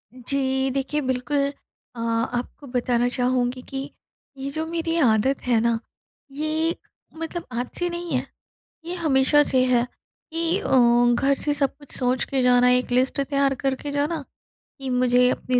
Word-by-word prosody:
जी। 265 +1 0
देखिए 275 +3 -1
बिल्कुल, 260 +2 -1 0.6
अ, 230 - -8
आपको 230 +4 -2
बताना 245 0 +2
चाहूँगी 250 0 0
कि 270 0 -5 0.5
ये 270 +1 -4
जो 315 +2 -3
मेरी 330 0 -2
आदत 260 -1 +2
है 235 -3 +4
ना, 235 -1 +1 0.5
ये 310 +3 -1 0.4
मतलब 330 +1 -4
आज 245 +1 -3
से 350 0 0
नहीं 345 0 -5
है। - - 0 0.6
ये 345 - -4
हमेशा 295 -3 +4
से 260 -3 +3
है, 245 -1 +2 0.5
कि 335 +3 0
अ, - - -5 0.5
घर 275 +3 +2
से 295 - +1
सब 280 -2 0
कुछ 290 -1 -15
सोच 250 -1 +1
के 270 -1 +1
जाना 250 0 +5
एक 250 0 +2
लिस्ट 255 +3 +2
तैयार 275 0 +1
करके 270 +2 -2
जाना 290 +1 -1 0.6
कि 270 -1 -5
मुझे 250 0 +3
अपनी 250 -1 0
265 Hz, 160 wpm, -24 LUFS, 250-295 Hz, 0.6 s, जाना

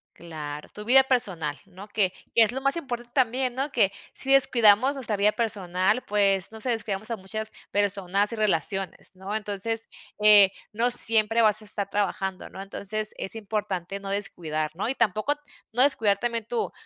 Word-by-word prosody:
Claro, 150 -3 -9
tu 210 - -11
vida 265 +3 +6
personal, 180 - -2
¿no? 195 +2 -14
Que 200 -3 0 0.2
que 230 - +6
es 220 - 0
lo 265 - -6
más 275 +2 +3
importante 240 -7 -7
también, 255 0 0
¿no? 275 +3 -3
Que 210 -7 +1 0.2
si 270 - -3
descuidamos 245 -1 +4
nuestra 235 -6 -4
vida 210 +1 +2
personal, 210 -1 -1
pues, 195 -1 0
no 220 - -11
sé, 255 - -1
descuidamos 215 -2 -3
a 230 - -4
muchas 215 +3 -6 0.2
personas 200 0 0
y - - -5
relaciones, 195 -2 -2
¿no? 190 +3 -7
Entonces, 220 +2 -3 0.3
eh, 205 -2 +7 0.2
no 235 +3 -1
siempre 225 -1 +8
vas 215 -1 +3
a - - -15
estar 205 -1 -1
trabajando, 195 -2 -3
¿no? 190 - -9
Entonces, 210 +2 -3
es - - -4
importante 200 -3 -5
no 195 0 -8
descuidar, 160 -6 -2
¿no? 195 - -4
Y 255 - -1
tampoco, 215 +8 0 0.4
no 245 +3 0
descuidar 220 -8 +2
también 230 -2 -3
tu 235 - -3
210 Hz, 180 wpm, -24 LUFS, 195-230 Hz, 0.4 s, siempre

